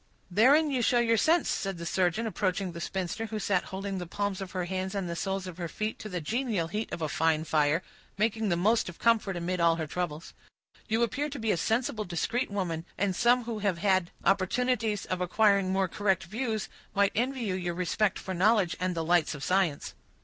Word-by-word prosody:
"Therein 280 - +5
you 255 -2 +1
show 240 +1 +3
your 230 -1 +3
sense," 320 +10 +3
said 195 -2 -2
the 170 - -6
surgeon, 185 +5 +1
approaching 190 -2 -1
the 170 0 -7
spinster, 190 +5 -3
who 215 0 -4
sat 195 -3 0
holding 195 0 -4
the 180 - -5
palms 200 +1 -2
of 190 - -5
her 180 -2 -1
hands 190 +2 -3
and 195 -3 -2
the 170 - -3
soles 195 +2 -2
of 185 -1 -8
her 170 - -2
feet 215 +6 -4
to 215 - -7
the 180 -2 -3
genial 215 - -1
heat 215 +5 -3
of 165 - -4
a - - +1
fine 155 +1 +1
fire, 155 +2 +2 0.3
making 220 0 +1
the 175 - +2
most 215 +4 +2
of 175 - -10
comfort 220 -5 +2
amid 180 +1 -2
all 170 -1 +4
her 160 -1 -3
troubles. 160 0 -4 0.5
"You 225 +1 +2
appear 285 +6 -1
to 285 - -6
be 225 -3 0
a - - +2
sensible, 225 +3 0
discreet 210 +8 -1
woman, 180 -5 -2
and 195 -1 0
some 245 +4 +4
who 230 -2 -4
have 200 -4 0
had 185 -1 +2 0.2
opportunities 215 +2 +1
of 185 -1 -3
acquiring 200 0 +3
more 190 0 +2
correct 190 0 0
views 220 +3 -3 0.3
might 200 0 +3
envy 255 +3 -1
you 205 -5 -1
your 175 -2 -2
respect 185 +3 0
for 190 - -5
knowledge 190 -1 +3
and 180 -1 -1
the 165 - -1
lights 175 -2 +2
of 140 - -8
science." 185 -6 0
195 Hz, 215 wpm, -29 LUFS, 175-220 Hz, 0.5 s, Therein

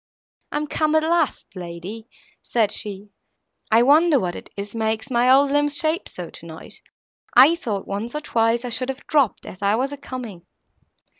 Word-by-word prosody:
"I - - -1
am 300 - -1
come, 310 +1 0
at 315 - +4
last, 325 - 0
lady," 180 +5 -7 0.3
said 220 -4 +1
she; 205 -1 -6 0.6
"I 225 +2 +5
wonder 300 +2 +5
what 180 -5 -3
it - - -10
is 200 +1 -6
makes 220 +2 -2
my 245 +1 +3
old 275 +1 +5
limbs 290 0 +2
shake 320 +3 -1
so, - - -8
tonight. - - -11 0.6
I 295 +5 +9
thought, 215 - -4
once 215 +6 -4
or 300 - -2
twice, 230 -1 +1
I - - -3
should 255 +2 -2
have 265 - -5
dropped, 280 - +1
as 185 - -10
I 200 +1 +2
was 265 +4 -1
a 285 - -6
coming." 235 -10 -8
240 Hz, 180 wpm, -22 LUFS, 210-290 Hz, 0.6 s, I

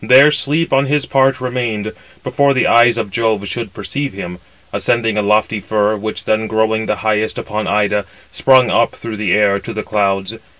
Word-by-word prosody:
There 135 +4 +6
Sleep 150 +3 0
on 135 +1 +3
his 145 0 0
part 135 -1 +2
remained, 120 -4 -3 0.3
before 140 +2 +1
the 130 - +2
eyes 120 0 +4
of 110 -4 -3
Jove 110 -2 -1
should 115 0 -4
perceive 140 +6 -4
him; 90 -2 -7 0.3
ascending 115 -2 0
a 105 - +1
lofty 105 +1 +1
fir, 105 +1 0
which 110 +1 -5
then 110 0 0
growing 110 0 0
the 105 - 0
highest 110 0 0
upon 110 0 -4
Ida, 105 0 0 0.3
sprung 130 -2 +4
up 115 - +2
through 115 -2 -7
the 105 -3 -1
air 100 -1 +2
to - - -8
the 110 - -4
clouds. 100 +1 -1
110 Hz, 185 wpm, -16 LUFS, 105-125 Hz, 0.3 s, There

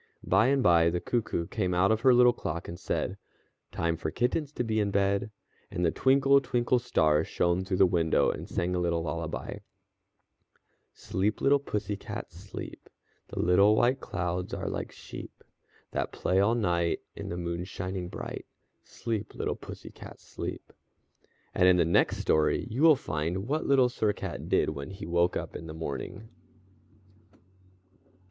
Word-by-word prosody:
By 100 +6 +3
and 135 -1 +2
by 85 -2 +5
the 85 +1 -1
cuckoo 110 -7 -1
came 90 -2 -1
out 95 +4 +4
of 110 0 +1
her 130 +1 +6
little 125 0 +6
clock 85 +2 -5
and 85 - -7
said: - - -2 0.5
"Time 85 0 0
for 80 - -3
kittens 130 - -1
to 125 - -1
be 110 -2 0
in 105 -1 +1
bed," 100 +2 +1 0.4
and 90 - -1
the 80 - +3
twinkle, 135 +4 +4
twinkle 125 -1 +1
star 75 -10 +2
shone 85 +1 0
through 95 0 -2
the 95 - +6
window, 85 -3 +2
and - - -7
sang 90 +1 -1
a 90 - 0
little 85 -1 0
lullaby: 85 0 -4 1.4
"_Sleep, 100 +3 -1
little 140 +1 +4
pussy 105 -6 -3
cat, - - -7
sleep. - - -9 0.4
The - - -10
little 100 +4 +5
white 125 +4 +3
clouds 90 -1 -3
are - - -4
like - - -4
sheep - - -10 0.5
That - - -2
play 95 - 0
all 105 +4 +3
the 120 - -1
night 85 -3 +1
while - - -6
the 85 - -4
moon's 85 +1 -4
shining 90 -1 -4
bright. - - -7 0.3
Sleep, 115 -3 -5
little - - -2
pussy - - -10
cat, - - -12
sleep._" - - -7 0.8
And 90 - +4
in 90 -1 +6
the 85 - +4
next 85 - +3
story 80 +5 +2
you 125 +6 -2
will 160 -1 +8
find 85 - -3
what 155 +4 -1
Little 135 -2 +5
Sir 110 -4 0
Cat - - -6
did - - +2
when 70 0 -6
he 95 0 -8
woke 85 +1 +1
up - - -6
in 80 - -7
the 80 - -7
morning. 80 +7 -5
95 Hz, 170 wpm, -29 LUFS, 85-120 Hz, 1.4 s, will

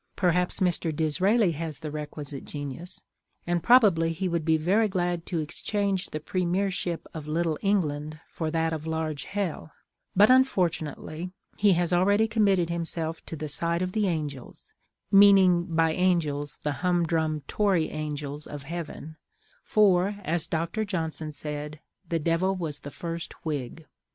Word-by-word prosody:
Perhaps 180 +1 +1
Mr. 175 -2 +2
Disraeli 185 +7 +2
has 160 -1 -4
the 155 -2 -6
requisite 150 -2 -4
genius, 145 +5 -6 0.4
and 175 0 0
probably 180 -7 +5
he 185 +3 -2
would 170 -2 -1
be 160 0 +3
very 195 +8 +2
glad 175 -3 -2
to 175 - -2
exchange 195 +4 -2
the 155 - -4
Premiership 180 +1 -1
of 155 -2 -7
little 160 0 0
England 155 -6 0
for 160 -2 -3
that 165 0 0
of 155 0 -5
large 160 -2 -2
hell: 190 -6 -3 0.4
but 205 +3 +7
unfortunately 180 - +1 0.3
he 205 -2 +4
has 175 0 +1
already 200 +5 +4
committed 200 -6 +2
himself 165 -1 -3
to - - -5
the 155 0 -5
side 170 +4 0
of 185 - -2
the 210 0 +1
angels, 150 -7 -4 0.5
meaning 195 -3 +6
by 165 -2 +1
angels 155 -6 0
the 150 - 0
humdrum 165 -4 +1
Tory 185 +1 +1
angels 150 -1 -4
of 145 -1 -7
heaven—for, 175 +5 -1
as 170 0 0
Dr. 170 +6 -1
Johnson 160 -6 -3
said, 150 0 -6 0.3
the 165 - +1
Devil 170 +4 +1
was 160 -5 -4
the 145 - -8
first 165 +2 -6
Whig. 150 0 -4
165 Hz, 145 wpm, -27 LUFS, 155-185 Hz, 0.5 s, but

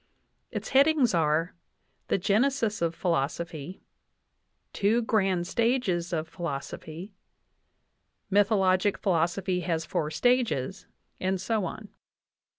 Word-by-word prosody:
Its - - -5
headings 275 -3 +4
are: 165 +1 +1 0.5
"The - - +2
genesis 215 +2 +1
of 170 -1 0
philosopy," 170 0 -2 0.9
"Two 220 +4 +2
grand 190 -6 +1
stages 195 -5 0
of 160 -2 -2
philoso 165 -5 -5
phy," 170 +6 -9 1.2
"Mythologic 200 -1 +3
philosophy 180 +1 0
has 165 -2 -2
four 155 0 -1
stages," 220 - 0 0.3
and 185 0 0
so 220 0 -1
on. 205 +4 -7
185 Hz, 100 wpm, -28 LUFS, 170-215 Hz, 1.2 s, headings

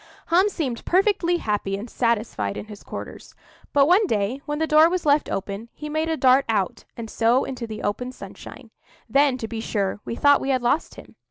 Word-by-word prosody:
Hum 365 +5 +4
seemed 270 - -4
perfectly 365 -2 +2
happy 205 -7 -2
and 210 +4 -7
satisfied 220 - -1
in - - -6
his 210 -2 -11
quarters; - - -9 0.4
but 280 -1 +5
one 380 +5 +4
day, 220 - -1
when 295 0 -2
the 320 - +1
door 310 +1 +6
was 360 -1 -2
left 290 0 +3
open, 200 +4 -4
he 300 - -7
made 315 +2 -1
a 320 - 0
dart 260 0 +5
out, 200 -4 -1
and 230 -1 -6
so 235 +4 +2
into 250 -3 -5
the 215 -1 -7
open 250 +5 -2
sunshine. - - -11 0.4
Then, 275 -2 +3
to 225 - -5
be 225 0 -5
sure, 200 -3 -2
we - - -5
thought 285 +3 +4
we 270 - -3
had 260 -2 +1
lost 280 +6 0
him. - - -14
255 Hz, 205 wpm, -23 LUFS, 220-305 Hz, 0.4 s, door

